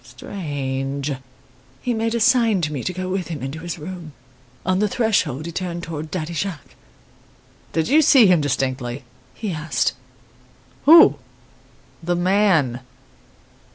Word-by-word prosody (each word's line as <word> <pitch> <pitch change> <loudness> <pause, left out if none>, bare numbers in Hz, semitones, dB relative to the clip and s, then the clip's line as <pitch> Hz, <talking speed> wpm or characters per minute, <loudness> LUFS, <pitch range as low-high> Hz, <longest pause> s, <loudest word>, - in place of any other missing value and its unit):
strange!' 135 -1 -4 0.7
He 245 - 0
made 225 0 -1
a - - 0
sign 230 -4 +3
to 150 -2 -2
me 135 - -4
to - - 0
go 185 +1 -5
with 185 -1 -2
him 155 -6 -6
into 135 +4 -5
his 170 +1 -5
room. 165 -1 -8 0.5
On 185 +1 +1
the 210 - +2
threshold 185 - 0
he 170 - -5
turned 175 -1 -4
towards 155 -1 -6
Daddy 170 -1 -4
Jacques. 175 -1 -4 1.0
"'Did 160 -1 0
you 310 +3 +5
see 275 -6 +6
him 180 -5 +4
distinctly?' 130 -2 -2 0.3
he 215 -4 -4
asked. 155 -1 -1 0.9
"'Who?' 325 +2 +8 0.8
"'The 175 +1 -1
man? 175 - +2
170 Hz, 140 wpm, -21 LUFS, 145-195 Hz, 1.0 s, Who